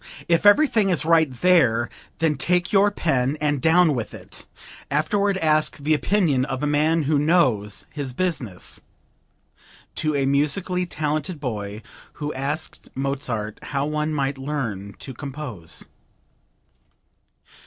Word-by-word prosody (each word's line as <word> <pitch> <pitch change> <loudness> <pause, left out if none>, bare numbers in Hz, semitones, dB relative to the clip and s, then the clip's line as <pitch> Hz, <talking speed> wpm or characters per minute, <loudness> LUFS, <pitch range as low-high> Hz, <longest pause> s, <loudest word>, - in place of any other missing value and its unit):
If 170 +4 +3
everything 215 -3 +5
is 175 -4 +1
right 160 -2 +4
there, 125 -5 +3 0.3
then 160 -1 +2
take 175 +6 0
your 200 +1 +5
pen 140 -7 0
and 145 -3 0
down 165 +1 +5
with 120 -4 -4
it; - - -10 0.4
afterward 200 +7 +1
ask 155 -3 +2
the 150 +2 +1
opinion 155 -5 +2
of 130 +1 -3
a - - +2
man 155 +2 +2
who 145 0 +2
knows 130 - +2
his 145 -3 -4
business." 125 - -3 1.2
(To 155 -1 +1
a 140 -1 +1
musically 165 +6 +1
talented 155 +1 -2
boy 105 -5 -5 0.3
who 150 0 -4
asked 145 +4 -4
Mozart 130 -6 -2
how 140 -1 -2
one 150 +1 -1
might 140 -2 -1
learn 120 -9 -4
to 130 - -8
compose.) 130 - -6
150 Hz, 130 wpm, -23 LUFS, 130-165 Hz, 1.2 s, everything